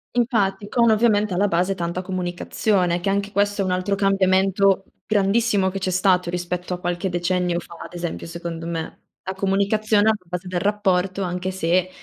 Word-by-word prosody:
Infatti, 215 -4 +1
con 235 0 +3
ovviamente 215 -3 +3
alla 200 +3 +2
base 180 +2 +1
tanta 175 0 -3
comunicazione, 180 0 -1
che 195 - -1
anche 200 +1 -1
questo 205 0 +1
è - - 0
un 185 - -1
altro 185 +2 0
cambiamento 195 0 +2 0.2
grandissimo 205 -1 +2
che 195 - -5
c'è 185 - -1
stato 185 -1 +2
rispetto 180 0 -3
a 180 - -4
qualche 175 +2 -2
decennio 175 0 0
fa, 170 - -12
ad 165 - -11
esempio, 175 -1 -4
secondo 165 -1 -6
me. 165 -1 -5 0.3
La 190 - -2
comunicazione 205 +2 +2
alla 220 - +4
base 180 +1 -5
del 180 -1 -1
rapporto, 195 -2 +1
anche 180 +1 -2
se 185 0 +1
190 Hz, 175 wpm, -22 LUFS, 180-200 Hz, 0.3 s, alla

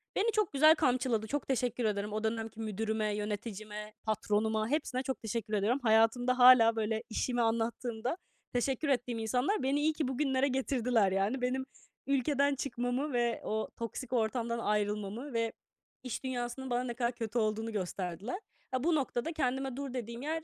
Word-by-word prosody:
Beni 445 +3 +2
çok 425 -6 0
güzel 310 +3 +7
kamçıladı. 245 -6 +1
Çok 290 +4 -2
teşekkür 245 -2 0
ederim. 210 0 -1
O 215 +1 -2
dönemki 225 0 -2
müdürüme, 220 0 -1
yöneticime, 210 0 -5
patronuma 215 0 0
hepsine 270 -3 -1
çok 265 0 -3
teşekkür 220 -1 -3
ediyorum. 210 +6 +2
Hayatımda 235 +3 +3
hâlâ, 245 -2 +8
böyle, 220 0 -1
işimi 240 +2 0
anlattığımda 230 +3 -1 0.4
teşekkür 265 +4 0
ettiğim 245 -3 0
insanlar 250 - 0
beni 275 +2 +2
iyi 310 +1 +3
ki 300 -3 -1
bugünlere 265 0 +1
getirdiler. 250 -6 +1
Yani, 200 +7 0
benim 260 +1 0 0.4
ülkeden 280 +1 +2
çıkmamı 255 +2 -2
ve 240 -1 +1
o 215 0 -2
toksik 235 +3 -5
ortamdan 235 0 0
ayrılmamı 210 +4 -1
ve 230 -1 0 0.5
iş 255 -1 -4
dünyasının 260 0 -3
bana 245 0 +1
ne 245 -1 -3
kadar 235 0 0
kötü 235 -1 -4
olduğunu 220 +1 0
gösterdiler. 190 - -3 0.3
A, 255 -1 -1
bu 335 +1 +3
noktada 275 +1 -1
kendime 265 -3 -1
dur 275 -1 -5
dediğim 235 -1 -5
yer 315 +3 -2
240 Hz, 160 wpm, -32 LUFS, 220-265 Hz, 0.5 s, hâlâ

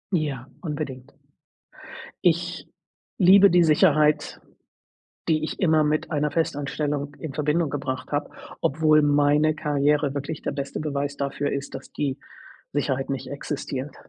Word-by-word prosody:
Ja, 145 -6 -2 0.2
unbedingt. 145 -5 -5 1.1
Ich 175 -2 0 0.5
liebe 195 +2 +7
die 175 0 +5
Sicherheit, 155 -2 +3 0.9
die 155 -1 +1
ich 155 - -4
immer 160 -4 +3
mit 155 +2 0
einer 150 0 0
Festanstellung 145 -2 -2
in 150 -4 -6
Verbindung 150 +2 +1
gebracht 135 -1 -4
habe, 145 0 -1 0.3
obwohl 155 +1 +3
meine 145 +1 +3
Karriere 145 -1 +1
wirklich 145 +2 -4
der - - -2
beste 140 0 -4
Beweis 145 -1 -3
dafür 140 +1 -2
ist, 140 0 -4
dass 135 - -8
die 140 -3 -3 0.5
Sicherheit 135 -2 -1
nicht 135 - -4
existiert. 140 -1 -5
145 Hz, 130 wpm, -24 LUFS, 140-155 Hz, 1.1 s, liebe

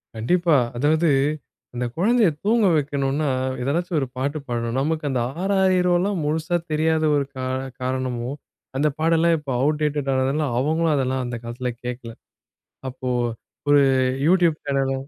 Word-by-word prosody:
கண்டிப்பா. 170 +8 +2 0.2
அதாவது 155 +5 +2 0.6
அந்த 125 0 -2
குழந்தைய 220 +5 +3 0.2
தூங்க 220 0 +3
வைக்கணுன்னா, 145 0 0 0.3
எதனாச்சும் 165 +6 -1
ஒரு 135 - -2
பாட்டு 140 +4 -1
பாடணும். 120 0 -2
நமக்கு 155 +3 -1
அந்த 130 -3 0 0.2
ஆராரிலோம் 190 -1 +2
முழுசா 160 +3 -1 0.2
தெரியாத 160 +1 +1
ஒரு 140 -1 +1
கா 130 - -4 0.4
காரணமோ! 130 -1 -2 0.5
அந்த 150 +3 +2
பாடெல்லாம் 165 +1 +3
இப்போ 150 -3 -6
அவுட் 150 +2 +1
டேட்டடா 145 -2 0
ஆனதுனால, 135 +4 +1
அவுங்களும் 160 +4 +1
அதெல்லாம் 130 -1 0
அந்த 120 -1 -4
காலத்தில 120 +2 -4
கேட்கல. 120 -1 -6 0.8
அப்போ 130 0 -7 0.6
ஒரு 145 0 +6 0.5
YouTube 175 -2 +4
சேனல 135 -1 0
150 Hz, 130 wpm, -23 LUFS, 130-165 Hz, 0.8 s, ஒரு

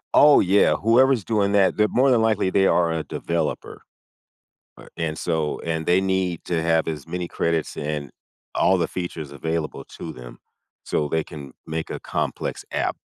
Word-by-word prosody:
Oh, 150 0 +8
yeah. 100 +2 +4
Whoever's 120 +1 +3
doing 100 -2 +1
that, 100 -2 +4
they're 105 0 +3
more 130 +4 +3
than 115 -2 +4
likely, 110 -4 +2
they 95 0 +3
are 85 -2 +3
a 80 -1 -2
developer. 85 -2 -3 1.0
Uh, - - -14
and 80 -1 -2
so, 80 -3 -1
and 80 -1 -3
they 90 +2 +3
need 95 -3 -1
to 85 -2 -1
have 80 0 +1
as 75 -4 -5
many 90 -1 -4
credits 85 -2 -1
and 75 -1 -4 0.4
all - - +3
the - - 0
features 80 -5 -5
available 80 +2 -3
to - - -6
them, - - -11 0.4
so 75 - -1
they 80 +1 0
can 70 -4 -10
make 80 0 -4
a - - -5
complex - - -3
app. - - -1
85 Hz, 175 wpm, -23 LUFS, 80-100 Hz, 1.0 s, Oh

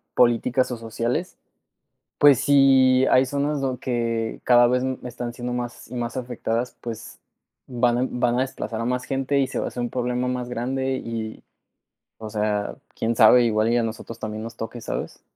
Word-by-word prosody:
políticas 125 +2 +3
o 125 - -3
sociales, 115 +8 -3 0.8
pues, 145 -4 +7
si 135 -2 +5
hay 130 +1 +5
zonas 145 +2 -1
dond 130 -2 -2
que 115 -3 -2
cada 120 -1 +6
vez 125 +1 +1 0.2
están 120 -1 -5
siendo 120 0 -4
más 120 -1 -5
y - - -8
más 120 0 -3
afectadas, 120 -1 -3
pues, 115 -1 -7 0.5
van 120 -1 +1
a 130 - +1
van 120 0 0
a - - +3
desplazar 115 -4 -4
a - - -2
más 125 +1 -1
gente, 135 +1 0
y 135 - +2
se - - -4
va - - -2
a - - -2
hacer 125 - -5
un 120 - -2
problema 125 0 -1
más 125 -1 -3
grande 130 +2 -2
y, 115 -3 -6 0.8
o 110 -1 -7
sea, 105 -1 -1 0.2
quién 115 +1 0
sabe, 120 +3 +7
igual 110 0 +2
y - - +3
a - - +1
nosotros 115 0 -6
también 110 0 -5
nos 115 - -8
toque, 115 +2 -6
¿sabes? - - -5
120 Hz, 190 wpm, -23 LUFS, 115-130 Hz, 0.8 s, pues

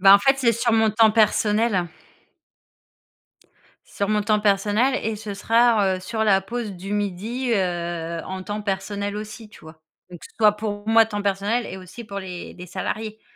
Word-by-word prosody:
Bah, 195 +1 +9
en - - +7
fait, 270 +7 +3
c'est 235 -3 +3
sur 235 +1 0
mon 220 -1 +3
temps 220 +1 +5
personnel. 210 -3 +2 2.0
Sur 200 - -3
mon 210 -1 +1
temps 210 +1 +1
personnel 210 +5 +2
et 220 0 -2
ce 210 -1 -6
sera, 230 +3 +3 0.2
r - - -2
heu, - - -9
sur 220 +4 -3
la 195 -2 +4
pause 225 +1 -5
du 190 +2 -7
midi, 210 +6 -2
heu, 170 -3 -2
en 190 0 -6
temps 210 +2 -5
personnel, 200 +1 -3
aussi, 215 +1 -8
tu - - -16
vois? 160 0 -14 0.3
Donc, 175 - -10 0.2
soit 210 -2 +6
pour 210 -1 -5
moi, 225 0 +5
temps 205 -2 -4
personnel 200 +4 0
et - - -7
aussi 185 +6 -10
pour 200 -2 -6
les 180 -2 -8
les 180 0 -10
salariés. 220 +4 -5
210 Hz, 185 wpm, -23 LUFS, 195-225 Hz, 2.0 s, Bah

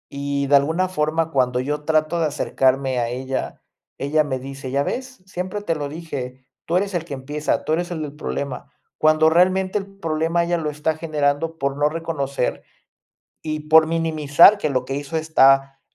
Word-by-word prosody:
y 140 0 -2
de 140 - +5
alguna 160 +6 0
forma 160 -1 -1
cuando 125 -2 +1
yo 150 +3 -3
trato 155 +1 +1
de 160 - +2
acercarme 130 -2 0
a 120 - 0
ella, 130 +2 -4 0.4
ella 150 +3 +1
me 130 -3 -3
dice: 135 0 -8
"¿Ya 140 +1 +1
ves? 255 - -5
Siempre 185 +2 -5
te 165 - -1
lo 145 -2 -4
dije, 135 -5 -7 0.2
tú 170 - +1
eres 195 +1 -1
el 170 -2 -1
que 155 - -7
empieza, 145 +3 -2
tú 155 - 0
eres 175 +2 -1
el 160 - -4
del 145 -1 -7
problema". 140 -3 -5 0.3
Cuando 155 0 +4
realmente 185 +3 +2
el 195 - -8
problema 165 -3 -1
ella 175 0 0
lo 155 -2 -2
está 150 +2 -1
generando 155 0 -1
por 140 -2 -2
no 145 +1 +2
reconocer 150 -5 -3 0.8
y 155 -1 -3
por 160 0 +7
minimizar 165 +3 +4
que 155 - -1
lo 130 -2 0
que 135 - -4
hizo 145 +3 -4
está 135 -3 +3
155 Hz, 185 wpm, -21 LUFS, 140-165 Hz, 0.8 s, por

